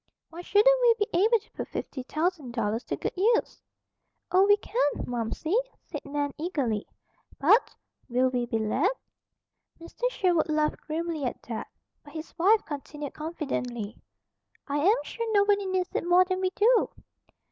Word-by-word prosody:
"Why 335 +2 -7
shouldn't 465 +7 +4
we 475 -2 +6
be 415 -2 0
able 430 +7 +4
to 440 - -18
put - - -6
fifty 260 - -5
thousand 305 -1 -2
dollars 225 0 -1
to - - -2
good - - -4
use?" 450 +5 +1 0.7
"Oh, 380 +2 +5
we 410 0 +6
can, 465 +3 -3 0.2
Momsey," 245 - -3 0.3
said - - -7
Nan 285 0 -2
eagerly. 275 - -1 0.5
"But, 410 - +4 0.3
will 250 +2 +2
we 245 -1 -1
be 230 -2 0
let?" 255 - +1 0.9
Mr. 340 +9 -3
Sherwood 355 -9 +1
laughed 305 0 0
grimly 320 -1 -2
at 245 - -4
that; 230 -2 -5 0.4
but 290 - -15
his 320 0 -7
wife 415 +5 +4
continued 290 0 -6
confidently: 250 -9 -4 0.7
"I 285 0 -1
am 395 +10 +4
sure 460 -1 -4
nobody 405 -1 +3
needs 370 -1 -1
it - - -2
more 360 +1 +6
than 370 0 -2
we 375 - +2
do." 445 +5 +3
335 Hz, 160 wpm, -27 LUFS, 275-405 Hz, 0.9 s, we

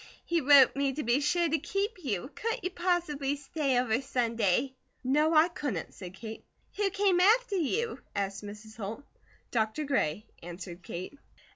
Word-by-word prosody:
He 340 -1 +1
wrote 275 -2 +7
me 275 -1 +1
to 300 - -3
be 240 +3 +2
sure 340 +4 +2
to 320 0 +1
keep 395 +4 -3
you. 255 - -3
Couldn't 460 +2 -3
you 365 - -2
possibly 340 -6 0
stay 280 -2 -1
over 245 0 +1
Sunday?" 240 -2 0 0.3
"No, 300 +5 +3
I 310 +2 +7
couldn't," 285 - -4
said 185 -1 -9
Kate. 220 +2 -8 0.3
"Who 410 -1 +2
came 390 -2 +2
after 435 +2 +4
you?" 440 - -1 0.2
asked 195 0 -2
Mrs. 210 +2 -10
Holt. 220 +5 -5 0.5
"Dr. 220 +5 0
Gray," 215 - 0 0.2
answered 175 +1 -8
Kate. 185 +11 -7
275 Hz, 160 wpm, -30 LUFS, 220-345 Hz, 0.5 s, wrote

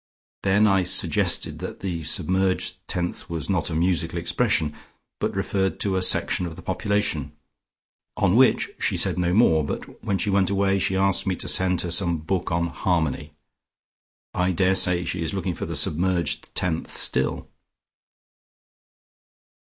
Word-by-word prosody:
Then 100 +2 +3
I 95 -2 +3
suggested 90 +1 +2
that - - -7
the 90 -4 -3
submerged 95 +3 +1
tenth 90 -1 -4
was 85 +2 -3
not 90 -5 0
a 80 - -4
musical 85 0 0
expression, 85 -3 0 0.5
but - - -2
referred 95 -1 -1
to 100 -2 0
a 95 - 0
section 90 -1 0
of 80 - -8
the - - -12
population. 100 -9 -2 0.8
On 90 - +2
which 130 +2 +4
she - - 0
said - - 0
no 90 -1 +1
more, 85 -6 +4
but 70 - -7
when 100 - 0
she 100 - -1
went 95 -2 +2
away 100 0 +1
she 95 0 -1
asked 95 0 +1
me 95 - +1
to - - -5
send 90 -1 +2
her 85 - -4
some 85 -1 0
book 85 +3 -3
on 85 0 0
'Harmony.' 80 -3 -1 1.0
I 90 +1 0
daresay 90 -1 +3
she 85 +1 -3
is 80 +4 -3
looking 95 -1 -2
for - - -6
the - - -4
submerged 85 -1 0
tenth 85 -3 0
still." 65 - 0
90 Hz, 155 wpm, -24 LUFS, 85-95 Hz, 1.0 s, which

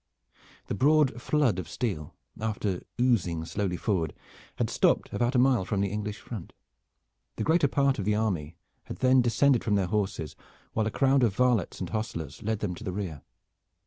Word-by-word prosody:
The - - -4
broad 135 +1 +3
flood 135 -11 +2
of 90 - -6
steel, 90 - -3 0.2
after 105 -4 -2 0.2
oozing 90 -10 +1
slowly 90 0 -2
forward, 85 -8 -1 0.4
had - - 0
stopped - - +1
about 120 +2 0
a - - +5
mile 125 -4 +4
from 100 +1 -2
the 100 - +1
English 105 0 -3
front. 105 -8 -8 0.8
The - - -2
greater 160 -1 +3
part 140 -1 +1
of 100 - -2
the 105 0 +2
army 90 -8 -1 0.3
had - - -7
then 130 0 +4
descended 120 +2 +3
from 105 - +1
their 100 -2 +2
horses, 95 -5 -2 0.4
while 110 -1 +1
a - - +1
crowd 135 +3 +3
of 110 -6 +2
varlets 125 -6 +1
and 90 - -4
hostlers 85 -9 -4
led 110 -1 -2
them 100 -4 -1
to 90 - -9
the 95 - -3
rear. 90 -6 -4
105 Hz, 180 wpm, -28 LUFS, 95-125 Hz, 0.8 s, a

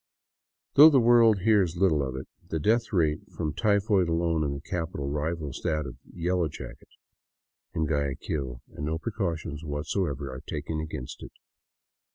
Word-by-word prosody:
Though 150 +3 +10
the 140 -4 +5
world 115 -4 +5
.hears 100 -5 +3
little 85 -5 +3
of 65 -1 -3
it, 65 - -6 0.2
the 80 - -1
death 115 +8 +2
rate 80 -6 +2 0.2
from 75 - -1
typhoid 100 -3 +2
alone 85 -1 +1
in 70 -1 -1
the - - -5
capital 80 -2 -4
rivals 75 0 -3
that 75 -2 0
of 65 - -8
" - - -18
Yellow 90 0 0
Jacket - - -10 0.5
" - - -58
in 80 - +1
Guaya 70 -2 0
quil; 65 -5 -4
and 75 - -7
no 80 +1 -1
precautions 85 -7 -3
whatever 75 -2 -2
are 65 - -7
taken 80 +1 -4
against 75 -5 -6
it. - - -10
80 Hz, 170 wpm, -27 LUFS, 75-95 Hz, 0.5 s, Though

